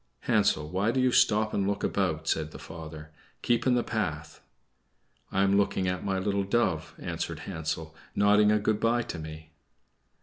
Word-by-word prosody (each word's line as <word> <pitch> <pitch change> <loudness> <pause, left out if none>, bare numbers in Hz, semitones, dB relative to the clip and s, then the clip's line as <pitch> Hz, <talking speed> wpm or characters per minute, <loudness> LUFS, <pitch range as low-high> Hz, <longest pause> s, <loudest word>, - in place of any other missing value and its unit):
"Hansel, 100 -9 +2
why 95 +6 0
do 130 - +1
you 130 0 +3
stop 110 -1 +3
and 100 -1 0
look 100 0 -1
about?" 80 -5 -1
said 80 -1 0
the - - -10
father. 80 -1 -9 0.3
"Keep 120 +1 +1
in 125 - +4
the 120 - +1
path." - - -3 0.9
"I 95 - +2
am 100 0 +3
looking 100 -2 +1
at 90 0 -2
my 95 -1 -1
little 100 +1 0
dove," 95 -7 0
answered - - -4
Hansel, 80 0 -4 0.2
"nodding 105 +1 +5
a 105 - +4
good 105 0 0
bye 120 +2 +2
to 85 - -6
me." 80 0 -9
100 Hz, 175 wpm, -28 LUFS, 80-105 Hz, 0.9 s, nodding